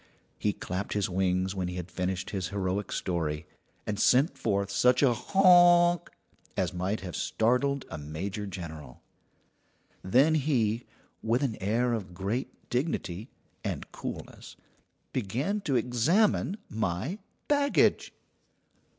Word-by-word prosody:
He 105 - +1
clapped 95 0 -4
his 100 -2 0
wings 95 0 +1
when 95 -2 -2
he 90 - -5
had 90 0 -6
finished 90 0 -2
his 95 -3 -2
heroic 100 0 -2
story, 80 -3 -2 0.4
and 105 -1 -3
sent 135 +7 +4
forth 100 -7 -1
such 125 +5 +4
a 130 -3 +5
"Honk!" 175 - +5 0.5
as - - 0
might 95 +4 -2
have 90 -3 -6
startled 125 +4 +1
a 80 - -7
major 95 +8 -5
general. 80 -9 -8 1.0
Then 130 - +4
he, 125 -7 +1 0.3
with 120 +5 +1
an 125 -6 0
air 115 +5 +1
of 95 -6 -4
great 100 +8 -4
dignity 120 - -2 0.3
and - - -4
coolness, - - -8 0.6
began 130 - -1
to 140 -5 +1
examine 155 - +2
my 110 - -2 0.3
baggage. 285 -1 +3
105 Hz, 125 wpm, -29 LUFS, 95-135 Hz, 1.0 s, a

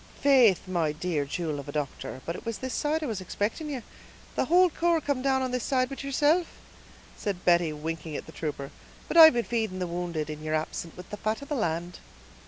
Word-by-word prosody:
"Faith, 250 -10 +5
my 170 -4 0
dear 155 -1 -2
jewel 155 0 -3
of 140 - -8
a - - -3
doctor, 145 -2 -4
but 170 - -3
it - - -8
was 230 -2 -3
this 260 -1 -5
side 310 +1 0
I - - -1
was 220 -7 -3
expicting 205 - -3
you; 265 -5 -4 0.5
the - - +1
whole 360 +1 +5
corps 340 +1 +2
come 285 -4 -1
down 265 0 +2
on 255 - -2
this 250 -1 -1
side 255 -2 +1
but 275 - -7
yeerself," 295 +5 +2 0.7
said 195 -3 -4
Betty, 170 -2 +4
winking 155 +1 -5
at - - -5
the - - -11
trooper; 145 -3 -5 0.4
"but - - -4
I've 320 -2 +10
been 240 -1 +1
feeding 220 -5 -1
the 180 - -1
wounded, 170 -3 -3
in 155 -1 -6
yeer 155 0 -1
absence, 155 +1 -4
with 180 - -11
the 210 - -5
fat 215 +6 -2
of 280 - -11
the 295 - -1
land." 175 -5 -2
195 Hz, 225 wpm, -28 LUFS, 160-270 Hz, 0.7 s, I've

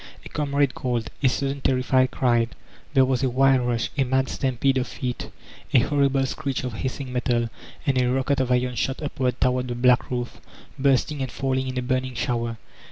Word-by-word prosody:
A - - -8
comrade 140 -2 0
called, 120 -3 -2
a 135 - +4
sudden 140 +1 -2
terrified 130 0 +2
cry. 120 -3 +2 0.5
There 135 -1 +6
was 130 -1 0
a 130 - +2
wild 130 0 +3
rush, 120 -1 -1
a - - +5
mad 130 +1 +1
stampede 130 0 +1
of 125 - -2
feet, 125 -2 -4 0.5
a - - +9
horrible 140 -1 +2
screech 135 -1 -3
of 125 -2 -3
hissing 130 +2 -4
metal, 120 -2 0 0.3
and 135 -3 +2
a 125 0 +2
rocket 135 +2 +1
of 130 -1 0
iron 125 0 +2
shot 130 +3 -1
upward 130 -4 -1
toward 125 0 +1
the 120 - -3
black 125 0 +3
roof, 120 -1 -4 0.4
bursting 140 +2 +2
and 130 - -3
falling 130 -1 -1
in 130 0 -4
a 125 - 0
burning 130 0 -1
shower. 115 -1 -1
130 Hz, 190 wpm, -24 LUFS, 125-135 Hz, 0.5 s, a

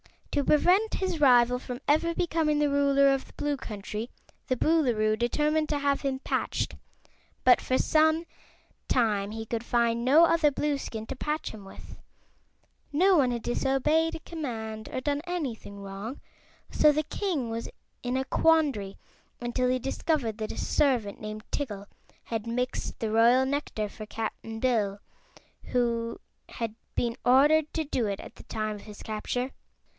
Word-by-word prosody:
To 285 - +1
prevent 370 +8 +4
his 370 -4 -2
rival 250 -3 +5
from 250 0 -7
ever 335 +3 +3
becoming 320 -3 +1
the 295 0 +2
Ruler 280 0 +4
of 270 - -3
the - - -18
Blue 290 -1 -2
Country 215 -1 -6 0.4
the 255 - +1
Boolooroo 235 -8 +2
determined 300 +6 +1
to 295 - +1
have 280 -1 +1
him 270 -2 -1
patched, - - -2 0.7
but 255 - +6
for 255 - 0
some 315 +1 +3 0.6
time 210 -5 +1
he 225 0 -5
could 230 +1 -3
find 235 -1 +1
no 295 +6 +7
other 330 -2 +4
Blueskin 275 -6 -3
to 270 - -6
patch 300 +3 -2
him 210 -3 -11
with. 195 - -12 1.0
No 365 +5 +5
one 265 -4 +4
had 235 -1 -3
disobeyed 290 +6 +1
a - - -6
command 220 -9 -5
or 255 - -3
done 290 +1 -1
anything 260 - -4
wrong, 200 +7 -7 0.5
so 300 - +5
the 305 +1 0
king 315 - -2
was 230 +1 -4 0.3
in 245 +1 -2
a 265 - +1
quandary 280 -11 +2 0.4
until 240 +1 0
he 255 0 +1
discovered 265 -3 -1
that 215 -1 -4
a - - -10
servant 250 -9 +1
named 215 0 -6
Tiggle 205 -8 -4 0.4
had 225 -1 -4
mixed 250 +2 -3
the 220 -1 -2
royal 235 +4 +5
nectar 265 -6 -2
for 215 +1 -9
Cap'n 225 0 -5
Bill, 210 -6 +1 0.7
who 235 -2 -1 0.3
had 230 -3 -4 0.2
been 235 0 -1
ordered 295 +5 +5
to 320 - 0
do 255 -6 -1
it 200 -1 -3
at - - -11
the - - -12
time 215 -1 -3
of - - -12
his 210 -1 -11
capture. 245 +4 -3
255 Hz, 160 wpm, -28 LUFS, 225-295 Hz, 1.0 s, no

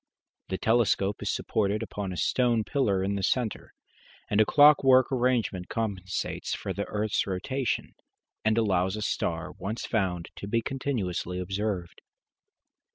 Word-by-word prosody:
The 95 - -1
telescope 110 -3 +2
is - - -2
supported 105 +1 0
upon 105 -3 -5
a 90 - -5
stone 120 0 +2
pillar 105 -8 +1
in 100 +1 0
the 100 - -2
centre, 115 +2 -1 0.6
and 105 +1 +4
a 110 - +3
clockwork 140 -3 +6
arrangement 120 -8 0
compensates 100 -5 -3
for - - -4
the - - -3
earth's 105 0 -1
rotation, 115 +7 -2 0.5
and 110 0 +2
allows 95 -3 +2
a 110 - -4
star - - -2
once 105 +4 -5
found 95 -6 -1
to 100 - -6
be 115 +2 0
continuously 110 -10 -2
observed. 95 -1 -3
105 Hz, 140 wpm, -28 LUFS, 95-120 Hz, 0.6 s, clockwork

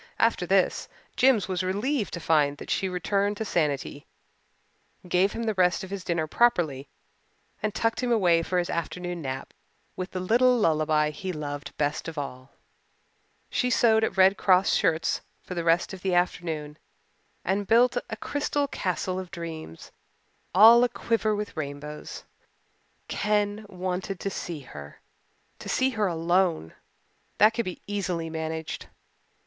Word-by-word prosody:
After - - +2
this - - +2 0.3
Jims 250 -5 +4
was 185 -1 -1
relieved 210 +6 -1
to - - -5
find 150 -3 +2
that - - -7
she 190 - 0
returned 200 +3 0
to 220 - -3
sanity, 145 -5 -1 1.0
gave 180 +3 +2
him 230 - -4
the 220 -1 0
rest 180 -2 +2
of 190 - -8
his 200 -2 -5
dinner 170 -3 -1
properly, 155 - +1 0.7
and 215 0 -2
tucked 225 +2 0
him 250 -1 0
away 180 -7 +4
for 180 +2 -2
his 175 -1 0
afternoon 175 +1 -4
nap 130 -2 -5 0.4
with 185 0 -4
the 185 - -4
little 245 +7 +4
lullaby 155 -5 +2
he 185 +5 -5
loved 145 -3 -6
best 150 +2 -1
of 165 -1 -7
all. 130 -2 -6 1.0
She 250 - +1
sewed 225 -2 +4
at 195 - -1
Red 190 +2 +6
Cross 185 0 +4
shirts 160 0 +1 0.2
for - - -7
the 170 -1 -2
rest 165 +3 +2
of 190 - -8
the 185 -2 0
afternoon 160 -4 -1 0.7
and 195 +2 0
built 240 +2 +4
a 220 - -3
crystal 290 +3 -1
castle 185 -5 -2
of 185 -1 -7
dreams, 160 - -8 0.6
all 230 +5 +9
a 245 - +3
quiver 220 -3 0
with 210 0 -5
rainbows. 150 0 -6 0.8
Ken 210 0 0
wanted 185 0 -4
to 195 - -2
see 170 -5 -5
her 75 - -11 0.6
to - - -8
see 260 +1 +2
her 215 -4 0
alone. 170 - +1 0.6
That 215 +2 +6
could 235 0 -1
be 185 - -6
easily 180 -5 -3
managed. 160 0 -4
180 Hz, 155 wpm, -26 LUFS, 160-210 Hz, 1.0 s, all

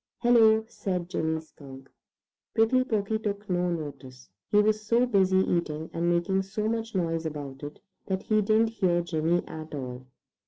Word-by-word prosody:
"Hello!" 220 -2 +5
said 180 -6 -3
Jimmy 160 0 0
Skunk. 135 -4 -13 0.7
Prickly 235 +3 +4
Porky 220 -3 -1
took 205 -1 -4
no 180 -2 0
notice. 140 - -7 0.2
He 205 - +4
was 215 0 +2
so 235 +3 +3
busy 190 -5 +3
eating, 165 -4 0
and 170 +1 0
making 175 +3 +1
so 210 +3 -3
much 225 -1 -3
noise 165 -2 -1
about 140 -3 -7
it, 145 0 -8 0.3
that 190 -1 -2
he 215 -1 +2
didn't 220 +2 +3
hear 180 -6 +1
Jimmy 170 +1 0
at 155 -1 -7
all. 130 -2 -6
180 Hz, 160 wpm, -27 LUFS, 160-215 Hz, 0.7 s, Hello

